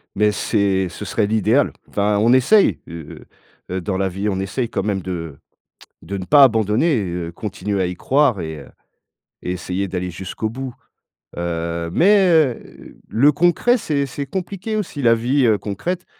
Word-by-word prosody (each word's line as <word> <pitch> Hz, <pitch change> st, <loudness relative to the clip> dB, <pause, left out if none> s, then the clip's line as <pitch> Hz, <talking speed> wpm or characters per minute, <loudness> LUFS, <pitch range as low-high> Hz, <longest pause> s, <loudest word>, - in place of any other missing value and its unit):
Mais 105 Hz, +1 st, +3 dB
c'est 100 Hz, -3 st, 0 dB
ce 105 Hz, -, -8 dB
serait 105 Hz, 0 st, 0 dB
l'idéal. 110 Hz, +5 st, +2 dB, 0.2 s
Enfin, 105 Hz, 0 st, +1 dB
on 115 Hz, +3 st, +4 dB
essaye, 150 Hz, -, +4 dB
heu 80 Hz, -2 st, -10 dB, 0.5 s
heu, 95 Hz, 0 st, -2 dB
dans 95 Hz, +2 st, -2 dB
la 95 Hz, 0 st, 0 dB
vie, 95 Hz, +3 st, -3 dB
on 95 Hz, -2 st, -2 dB
essaye 115 Hz, +5 st, -2 dB
quand -, -, -2 dB
même 100 Hz, -2 st, -1 dB
de 85 Hz, -5 st, -6 dB, 0.7 s
de 100 Hz, -, -5 dB
ne 95 Hz, -, -5 dB
pas 145 Hz, +7 st, +7 dB
abandonner, 115 Hz, -, +2 dB
heu, 85 Hz, -2 st, -4 dB
continuer 100 Hz, +1 st, -3 dB
à -, -, +1 dB
y 90 Hz, -, -4 dB
croire 135 Hz, -2 st, +2 dB
et 80 Hz, -2 st, -6 dB
heu, -, -, -13 dB, 0.7 s
et 90 Hz, -, -3 dB
essayer 90 Hz, +2 st, -3 dB
d'aller 90 Hz, -1 st, -4 dB
jusqu'au 95 Hz, +5 st, -5 dB
bout. 130 Hz, +2 st, -6 dB, 0.6 s
Heu, 85 Hz, -1 st, -3 dB
mais, 195 Hz, -, +4 dB
heu, 155 Hz, -8 st, 0 dB
le 140 Hz, +6 st, +4 dB
concret, 175 Hz, -, +3 dB
c'est 145 Hz, -10 st, -1 dB
c'est 140 Hz, +2 st, -5 dB
compliqué 190 Hz, +6 st, -4 dB
aussi, 185 Hz, -9 st, -3 dB
la 115 Hz, -2 st, +5 dB
vie, 125 Hz, +4 st, +1 dB
heu, 110 Hz, -3 st, +4 dB
concrète, 170 Hz, -, -4 dB
105 Hz, 175 wpm, -20 LUFS, 95-140 Hz, 0.7 s, pas